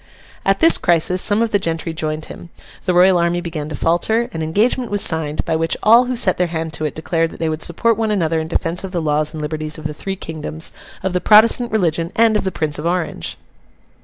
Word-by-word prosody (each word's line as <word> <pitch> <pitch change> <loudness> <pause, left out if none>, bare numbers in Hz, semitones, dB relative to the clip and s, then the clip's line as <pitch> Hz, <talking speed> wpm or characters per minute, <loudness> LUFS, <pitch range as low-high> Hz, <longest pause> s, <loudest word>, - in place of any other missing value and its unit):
At 195 0 +1
this 330 - +5
crisis, 175 +2 +3
some 210 +2 +4
of 230 - -2
the 205 - +2
gentry 165 -2 -3
joined 155 -1 -4
him; 170 - -11 0.4
the 180 - +1
Royal 180 0 +5
army 170 +1 0
began 160 -4 -5
to 155 - -5
falter; 220 +10 0
an 165 - -4
engagement 215 +10 0
was 205 -1 0
signed, 155 -2 0
by 160 - -1
which 165 +1 -1
all 230 +4 +6
who 250 0 -2
set 200 -7 +2
their 180 - +2
hand 160 -1 -4
to 155 - -2
it 150 - -4
declared 165 +1 -1
that - - -12
they 160 -1 -1
would 155 0 -4
support 225 +7 0
one 225 -1 -1
another 165 -6 0
in 160 - -4
defence 165 +2 -2
of 190 -1 -7
the 175 - -1
laws 150 -1 +1
and 155 - -7
liberties 155 0 -4
of 155 - -11
the 155 - -3
three 195 +5 -5
Kingdoms, 160 -2 -6 0.3
of 190 -1 -2
the 180 - 0
Protestant 230 +3 +5
religion, 170 -5 0
and 225 -1 +3
of 210 - 0
the 190 - -1
Prince 155 -3 -3
of 160 - -3
Orange. 175 -1 -3
170 Hz, 240 wpm, -18 LUFS, 160-195 Hz, 0.4 s, all